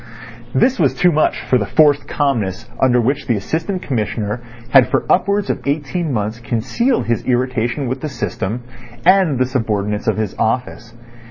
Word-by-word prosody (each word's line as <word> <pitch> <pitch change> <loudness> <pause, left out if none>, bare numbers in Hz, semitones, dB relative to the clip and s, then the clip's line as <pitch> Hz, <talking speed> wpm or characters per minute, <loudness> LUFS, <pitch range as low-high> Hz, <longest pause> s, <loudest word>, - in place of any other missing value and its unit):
This 260 +1 +3
was - - +2
too 180 -1 +3
much 155 -1 +1
for 125 - +3
the 100 - -2
forced 145 -2 +3
calmness 120 -10 -1
under 125 -2 +4
which 130 +4 -1
the 120 - +2
Assistant 165 - -3
Commissioner 105 -2 -2 0.3
had 135 -2 +6
for - - 0
upwards 200 +2 +2
of - - -4
eighteen 150 +3 -1
months 110 -1 -2
concealed 130 - 0
his 115 0 -1
irritation 125 +1 0
with 130 +2 -3
the 155 - -3
system 120 -3 -4 0.4
and 185 -6 +4
the 130 - +2
subordinates 105 -5 -2
of 110 - +1
his 110 -3 -2
office. 115 0 -2
130 Hz, 165 wpm, -18 LUFS, 115-150 Hz, 0.4 s, had